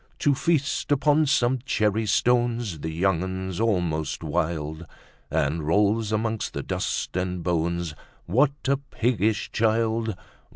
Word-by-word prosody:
To 145 - +3
feast 155 +1 0
upon 150 +2 +3
some 130 -2 +2
cherry 110 -4 +1
stones 120 -4 +1
The 80 - -4
young 85 +1 +1
un's 95 0 -4
almost 90 -8 0
wild, 80 0 -2 0.4
And 75 +4 0
rolls 105 +7 +2
amongst 110 0 -1
the - - -3
dust - - -2
and 90 -1 -2
bones, 85 -1 -1 0.3
What 130 - +3 0.2
a 140 0 +3
piggish 110 -6 -1
child! 110 -1 +1
105 Hz, 125 wpm, -25 LUFS, 85-120 Hz, 0.4 s, To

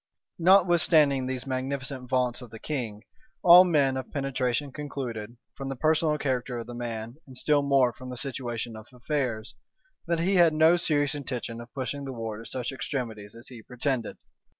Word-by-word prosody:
Notwithstanding 165 -7 +5
these 130 0 -3
magnificent 130 0 -3
vaunts 125 -1 +1
of 125 - -10
the 110 - -10
king, 115 -5 -4 0.4
all 180 0 +10
men 145 -7 +2
of 130 - -6
penetration 135 -1 -1
concluded, 125 -6 -6 0.2
from 135 -1 -5
the 135 - -3
personal 155 +2 +2
character 130 -3 -2
of 115 - -5
the 120 - -8
man, 115 0 -5
and 130 -1 -9
still 145 +2 +3
more 135 -3 +3
from 130 +1 -10
the 125 - -6
situation 120 -3 -4
of 110 0 -11
affairs, 125 -3 -3 0.5
that 170 -1 +1
he 190 +3 +2
had 170 -3 +5
no 160 +2 +6
serious 150 -4 +1
intention 125 -5 -5
of 120 0 -12
pushing 140 +1 -3
the 135 - -5
war 115 -2 -5
to 115 - -10
such 125 0 -3
extremities 115 -7 -5
as 115 +2 -9
he 120 -3 -10
pretended. 125 0 -3
130 Hz, 175 wpm, -27 LUFS, 120-145 Hz, 0.5 s, all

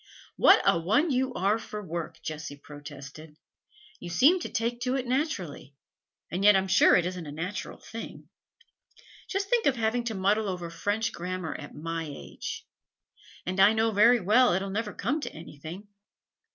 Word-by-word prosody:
'What - - +6
a 170 - +4
one 230 - +2
you 260 0 +1
are 200 +4 +1
for 210 -1 -7
work!' 170 -4 -6
Jessie 155 -2 -5
protested. 145 +1 -11 0.6
'You - - -7
seem 280 - +5
to - - -5
take 235 +1 -2
to 250 +1 0
it 260 -2 -2
naturally, 240 - -3 0.6
and 185 +3 -2
yet 210 0 +8
I'm 190 0 +2
sure 190 - +6
it 175 - +3
isn't 180 -3 -4
a - - -6
natural 175 +7 -5
thing. 230 0 -9 1.0
Just 395 +2 -2
think 475 -2 +3
of 275 - +3
having 230 +1 0
to 225 -2 -2
muddle 200 +2 +1
over 175 -2 -5
French 205 +7 -1
grammar 180 -1 -4
at 145 - -9
my 165 +1 -4
age! 140 - -7 0.8
And 185 +2 -3
I 200 +3 +7
know 225 0 +2
very 230 +4 +5
well 225 +6 +4
it 190 +2 0
'll 195 - -5
never 210 +1 -2
come 275 +12 -2
to - - -5
anything. 160 +5 -9
195 Hz, 175 wpm, -28 LUFS, 165-230 Hz, 1.0 s, yet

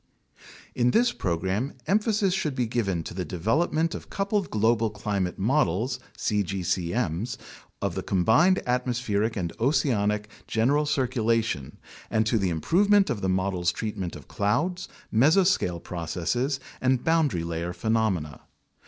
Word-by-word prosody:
In 120 0 +2
this 240 - +3
program, 95 - -2
emphasis 210 -1 +2
should 155 -7 -1
be 125 -2 +1
given 100 -7 -1
to - - -7
the 90 +1 -3
development 150 - 0
of - - -8
coupled 200 -1 -1
global 110 +1 +2
climate 100 -3 -2
models 125 - +1 0.2
(cgcm's) 100 +2 -1 0.5
of - - 0
the - - -3
combined 115 - +3
atmospheric 120 -3 0
and 85 -3 -2
oceanic 105 -5 +1 0.2
general 140 +7 +2
circulation 115 - 0 0.3
and 110 0 +1
to 110 0 +2
the 95 -2 +1
improvement 195 - +3
of 110 -5 -3
the 95 - 0
models' 95 -2 +1
treatment 100 -3 -4
of 75 -3 -11
clouds, 175 - -1 0.3
mesoscale 150 - +3
processes, 90 - -2 0.2
and 130 -1 +2
boundary 160 - +2
layer 85 +1 -3
phenomena. 95 - -1
110 Hz, 125 wpm, -26 LUFS, 95-140 Hz, 0.5 s, this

